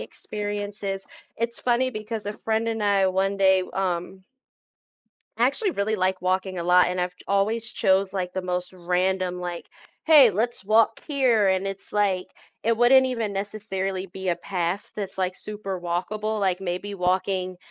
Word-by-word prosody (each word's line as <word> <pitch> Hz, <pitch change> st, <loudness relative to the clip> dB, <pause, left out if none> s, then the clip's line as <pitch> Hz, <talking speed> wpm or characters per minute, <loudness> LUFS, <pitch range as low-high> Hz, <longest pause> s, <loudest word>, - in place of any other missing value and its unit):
experiences. 205 Hz, -1 st, -5 dB, 0.3 s
It's 235 Hz, +1 st, -3 dB
funny 255 Hz, +1 st, +2 dB
because 215 Hz, -1 st, -5 dB
a 205 Hz, -, -2 dB
friend 220 Hz, +1 st, -1 dB
and 225 Hz, -1 st, -2 dB
I, 200 Hz, -2 st, +3 dB
one 190 Hz, +1 st, +1 dB
day, 190 Hz, -1 st, +4 dB
w -, -, -10 dB
um 185 Hz, 0 st, -2 dB, 1.2 s
I -, -, +4 dB
actually 420 Hz, -5 st, 0 dB
really 215 Hz, -1 st, 0 dB
like 185 Hz, -1 st, 0 dB
walking 185 Hz, 0 st, 0 dB
a 170 Hz, -, -3 dB
lot, 180 Hz, +1 st, +5 dB
and 180 Hz, 0 st, -2 dB
I've 180 Hz, 0 st, -2 dB
ch -, -, -16 dB
always 220 Hz, +4 st, 0 dB
chose 190 Hz, 0 st, +2 dB
like 180 Hz, -2 st, -3 dB
the 185 Hz, 0 st, -3 dB
most 180 Hz, 0 st, -3 dB
random, 180 Hz, 0 st, 0 dB
like, 175 Hz, -1 st, -5 dB, 0.4 s
"Hey, 290 Hz, -8 st, +8 dB
let's 220 Hz, +2 st, -2 dB
walk 220 Hz, +2 st, +3 dB
here," 250 Hz, -9 st, +3 dB
and 190 Hz, +1 st, +1 dB
it's 195 Hz, 0 st, -6 dB
like, 195 Hz, -3 st, +1 dB, 0.4 s
it 230 Hz, 0 st, +2 dB
wouldn't 260 Hz, +2 st, +6 dB
even 230 Hz, -5 st, -2 dB
necessarily 195 Hz, -2 st, -3 dB
be 190 Hz, +1 st, -6 dB
a 175 Hz, -, +2 dB
path 180 Hz, +1 st, -3 dB
that's 195 Hz, -2 st, -5 dB
like 185 Hz, -1 st, 0 dB
super 200 Hz, -3 st, -6 dB
walkable, 210 Hz, +5 st, -2 dB
like, 185 Hz, -2 st, +1 dB
maybe 190 Hz, +2 st, -4 dB
walking, 185 Hz, 0 st, 0 dB
195 Hz, 170 wpm, -25 LUFS, 185-215 Hz, 1.2 s, Hey